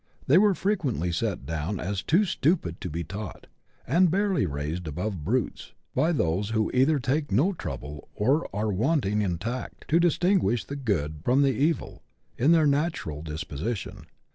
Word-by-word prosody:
They 145 - +5
are 200 0 +5
frequently 140 - 0
set 75 -5 -2
down 80 +6 -3
as 100 +2 -2
too 180 - +3
stupid 145 - 0
to 90 - -4
be 85 +2 -3
taught, 100 +5 -7 0.4
and 175 +7 +4
barely 190 - +1
raised 75 +4 -4
above 90 +2 -3
brutes, 120 +6 -2 0.2
by 155 +7 +2
those 100 - 0
who 110 -1 0
either 135 +4 +4
take 140 +2 -1
no 145 - +3
trouble, 75 - -7
or 135 +10 +1
are 105 +2 -1
wanting 105 - +1
in 90 -4 0
tact, 115 +8 -5
to 165 - +4
distinguish 175 - +2
the 140 - -6
good 80 - -2
from 130 +6 +3
the 135 - +4
evil 150 +8 -1 0.3
in 135 +7 +3
their 165 -2 +5
natural 140 - 0
disposition. 80 - -5
115 Hz, 165 wpm, -27 LUFS, -, 0.4 s, They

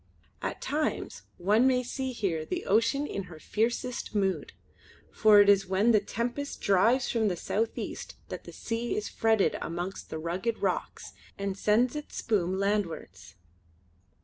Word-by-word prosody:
At - - -4
times 300 +1 -2 0.2
one 210 +8 +4
may 250 -1 +3
see 260 +1 -3
here 185 -10 -1
the - - -4
ocean 230 +7 +2
in 200 -8 -4
her 175 -3 -11
fiercest 235 +6 -2
mood; 195 -2 0 0.6
for 210 -2 +6
it 205 - +4
is 200 -2 +5
when 195 +5 +3
the 215 - +5
tempest 240 +7 -3
drives 225 +7 +3
from 225 -2 +1
the 185 - 0
south 220 +6 -2
east - - -5
that - - -6
the - - -9
sea 235 +1 -3
is 210 - -2
fretted 220 -3 +2
amongst 175 +3 -5
the - - -4
rugged 180 +8 -2
rocks - - -3 0.2
and 200 -1 -2
sends 220 +6 +2
its 300 0 -7
spume 190 -4 0
landwards. 170 - -2
210 Hz, 155 wpm, -29 LUFS, 190-235 Hz, 0.6 s, for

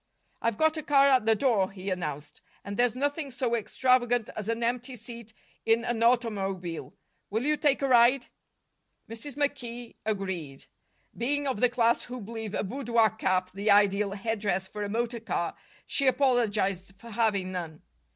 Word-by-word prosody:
"I've 230 -2 0
got 315 0 +2
a - - -2
car 280 -1 +4
at 255 -5 +3
the 225 - +5
door," 215 -6 +2
he 195 0 -6
announced, 150 -5 -5 0.2
"and 200 - -5
there's 245 +1 +2
nothing 285 +2 -1
so 250 -2 -2
extravagant 245 0 +1
as 215 0 -5
an 230 +1 -1
empty 250 +2 -2
seat 235 -1 -9 0.3
in 225 +1 +2
an 240 -2 -1
automobile. 195 -8 0 0.3
Will 220 +4 -1
you 300 +1 +3
take 290 -2 +1
a - - +2
ride?" 245 +1 +5 0.8
Mrs. 230 +5 -8
McKee 245 -5 -3
agreed. 190 -10 -4 0.5
Being 285 +4 0
of 260 -6 -1
the 250 - +4
class 235 -1 +2
who 250 0 -7
believe 220 -1 -6
a - - 0
boudoir 235 -1 +1
cap 185 -4 0
the 200 +3 -2
ideal 200 0 +4
headdress 200 -3 -1
for 210 +2 -7
a 205 - -2
motor 235 +2 -2
car, 225 - -2 0.3
she 275 - +1
apologized 215 -8 +1
for 230 +3 -12
having 205 -4 0
none. 170 -4 -6
230 Hz, 165 wpm, -28 LUFS, 200-250 Hz, 0.8 s, the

